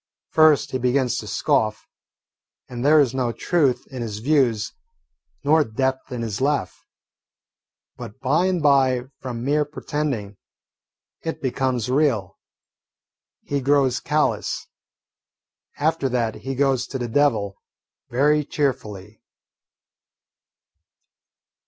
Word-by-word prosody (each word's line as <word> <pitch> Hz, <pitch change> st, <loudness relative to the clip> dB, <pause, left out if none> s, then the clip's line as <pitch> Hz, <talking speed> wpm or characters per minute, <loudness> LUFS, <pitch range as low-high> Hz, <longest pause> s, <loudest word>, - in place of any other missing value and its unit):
First, 155 Hz, -2 st, +4 dB
he 130 Hz, -, -1 dB
begins 125 Hz, -1 st, +1 dB
to 110 Hz, -, -8 dB
scoff, 110 Hz, +1 st, 0 dB, 0.8 s
and 120 Hz, -1 st, -6 dB
there 155 Hz, +2 st, +6 dB
is 135 Hz, -4 st, +3 dB
no 130 Hz, -3 st, 0 dB
truth 140 Hz, 0 st, +1 dB
in 130 Hz, -2 st, -6 dB
his 110 Hz, -3 st, -4 dB
views 125 Hz, -3 st, +1 dB, 0.7 s
nor 155 Hz, +2 st, +4 dB
depth 130 Hz, +3 st, -2 dB
in 120 Hz, -2 st, -3 dB
his 110 Hz, 0 st, -4 dB
laugh. 145 Hz, +1 st, -1 dB, 1.1 s
But 105 Hz, -, -9 dB
by 150 Hz, +7 st, +2 dB
and 180 Hz, -4 st, 0 dB
by, 135 Hz, -3 st, +4 dB, 0.2 s
from 120 Hz, -2 st, -5 dB
mere 150 Hz, +2 st, +2 dB
pretending, 145 Hz, -8 st, -4 dB, 0.8 s
it 160 Hz, -, -4 dB
becomes 130 Hz, -3 st, -1 dB
real. 130 Hz, -, 0 dB, 1.0 s
He 140 Hz, -1 st, -2 dB
grows 135 Hz, -2 st, +2 dB
callous. 150 Hz, 0 st, -1 dB, 1.1 s
After 155 Hz, -2 st, +1 dB
that 120 Hz, -3 st, 0 dB
he 135 Hz, +3 st, -6 dB
goes 135 Hz, -2 st, +1 dB
to 135 Hz, -, -4 dB
the 120 Hz, -2 st, -3 dB
devil 110 Hz, -7 st, +1 dB, 0.5 s
very 150 Hz, +4 st, +3 dB
cheerfully. 110 Hz, -, -3 dB
130 Hz, 110 wpm, -23 LUFS, 120-145 Hz, 1.1 s, there